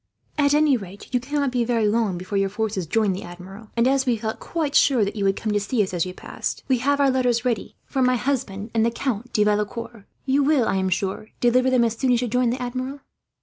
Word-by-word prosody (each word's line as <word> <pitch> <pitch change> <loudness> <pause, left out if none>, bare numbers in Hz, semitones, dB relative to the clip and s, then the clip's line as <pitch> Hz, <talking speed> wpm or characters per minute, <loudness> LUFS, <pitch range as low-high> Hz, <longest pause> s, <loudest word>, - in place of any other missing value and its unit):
At 290 -1 +3
any 300 -2 +4
rate, 200 +3 -11
you 250 - +3
cannot 280 +1 -1
be 245 -1 +1
very 230 -2 +1
long 210 -4 +1
before 185 +3 -6
your 195 0 +1
force 220 +1 -2
joins 210 +1 +1
the 190 - -6
Admiral; 190 +5 -11
and 235 +2 +4
as 270 0 +2
we 240 -2 +2
felt 220 0 -4
quite 310 -4 -2
sure 250 -7 +4
that 200 - -4
you 205 - -2
would 195 0 +2
come 215 - -3
to 205 - +2
see 210 +2 0
us, 190 - -5
as 175 0 0
you 180 - -6
passed, - - -5
we 260 -3 +2
have 285 +3 +1
our 275 -1 +4
letters 250 -2 +1
ready 235 -5 -2 0.2
to 265 - +1
my 250 0 +4
husband 230 -5 -2
and 225 -1 +2
the 230 - +3
Count 240 -1 -3
de 210 - +3
Valecourt. 210 +1 -2 0.2
You 275 +2 +2
will, 280 -4 +3
I - - +1
am 190 0 0
sure, 195 +3 -2
deliver 250 +2 +3
them 255 -2 +3
as 230 -1 0
soon 255 +2 +1
as 240 - +2
you - - -1
join 250 +1 +1
the 245 - -2
Admiral." 255 +3 -4
235 Hz, 255 wpm, -23 LUFS, 205-260 Hz, 0.2 s, any